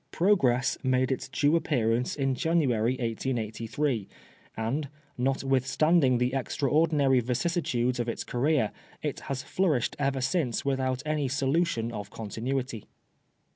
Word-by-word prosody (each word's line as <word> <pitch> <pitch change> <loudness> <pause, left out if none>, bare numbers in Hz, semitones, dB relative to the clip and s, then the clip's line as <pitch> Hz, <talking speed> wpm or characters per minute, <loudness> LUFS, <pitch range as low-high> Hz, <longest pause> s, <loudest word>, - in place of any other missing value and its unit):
Progress 135 -10 +2
made 130 0 +1
its 130 - -2
due 145 +4 +2
appearance 125 -7 +1
in 135 -2 0
January, 130 -7 +1
1883, 115 0 -2 0.5
and, 130 +6 -2 0.3
not 135 +2 0
withstanding 135 +1 +3
the 125 +1 0
extraordinary 140 0 +2
vicissitudes 125 -1 0
of 120 0 -1
its - - -3
career, 135 -2 +1 0.3
it - - -2
has 130 -1 -2
flourished 150 -5 0
ever 135 -1 0
since 135 -2 0
without 130 -1 0
any 150 -2 0
solution 135 -3 0
of 105 -3 -6
con 110 -1 -7
tinuity. 125 0 -3
130 Hz, 125 wpm, -28 LUFS, 120-145 Hz, 0.5 s, withstanding